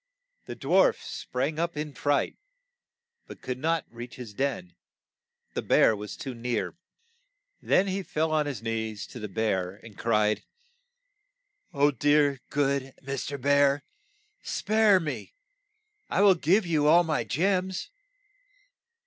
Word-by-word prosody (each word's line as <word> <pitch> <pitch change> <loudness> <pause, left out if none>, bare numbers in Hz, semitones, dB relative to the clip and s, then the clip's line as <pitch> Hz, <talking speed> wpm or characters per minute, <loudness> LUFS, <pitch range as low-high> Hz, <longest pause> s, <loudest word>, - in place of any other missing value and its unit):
The - - -6
dwarf - - +3
sprang 140 +5 -3
up 170 -2 -1
in 150 0 -3
a - - -21
fright, 145 +2 0 0.9
but - - -11
could 125 0 -4
not 165 +2 0
reach 120 +1 -9
his 120 -5 -9
den, 135 -7 -2 0.8
the - - -2
bear 110 - +4
was 105 0 -7
too 135 - -5
near. 120 -1 -3 0.9
Then 190 - +3
he 195 0 -2
fell 160 -3 -1
on 155 -1 +1
his 125 -7 -5
knees 110 -2 -3
to 125 - -10
the 105 - -5
bear 95 -3 -1
and 115 -3 -12
cried, 105 -1 +1 1.3
"O, 145 +1 +3
dear, 145 0 +2
good 140 -2 0
Mr. 140 +1 -4
Bear, 140 +1 +3 0.6
spare 215 -2 +3
me! 160 - -5 0.7
I - - +1
will 200 -1 +7
give 180 +4 +2
you 155 -3 +2
all 170 +3 +6
my 160 -2 0
gems. 185 - -1
140 Hz, 135 wpm, -27 LUFS, 120-160 Hz, 1.3 s, will